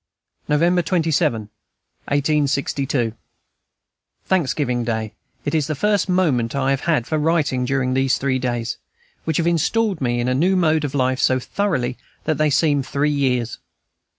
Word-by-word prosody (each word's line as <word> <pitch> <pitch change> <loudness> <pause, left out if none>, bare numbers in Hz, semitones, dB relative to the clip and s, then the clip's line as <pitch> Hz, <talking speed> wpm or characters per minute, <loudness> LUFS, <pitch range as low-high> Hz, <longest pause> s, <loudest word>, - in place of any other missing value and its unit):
November 170 +4 +3
27, 160 - +1 0.6
1862. 140 -4 0 1.1
Thanksgiving 140 -8 0
Day; 110 -2 -3 0.3
it 145 - -1
is 155 -3 +1
the 155 - -2
first 205 +4 +1
moment 145 -11 +1
I 135 0 +1
have 135 - +1
had 155 -9 +1
for 155 +2 -1
writing 150 -5 +1
during 130 -1 0
these 135 0 +2
three 130 -1 0
days, 120 -2 -2 0.5
which 160 -2 0
have 165 - +1
installed 180 +3 +1
me 120 -2 0
into 120 +1 0
a - - +2
new 175 +9 +2
mode 160 -4 +2
of 145 -1 -3
life 130 -1 +1
so 130 -1 +3
thoroughly 130 -5 -2 0.2
that 155 -3 -1
they 155 0 +3
seem 145 0 +2
three 140 +3 0
years. 125 -5 0
140 Hz, 150 wpm, -21 LUFS, 130-160 Hz, 1.1 s, November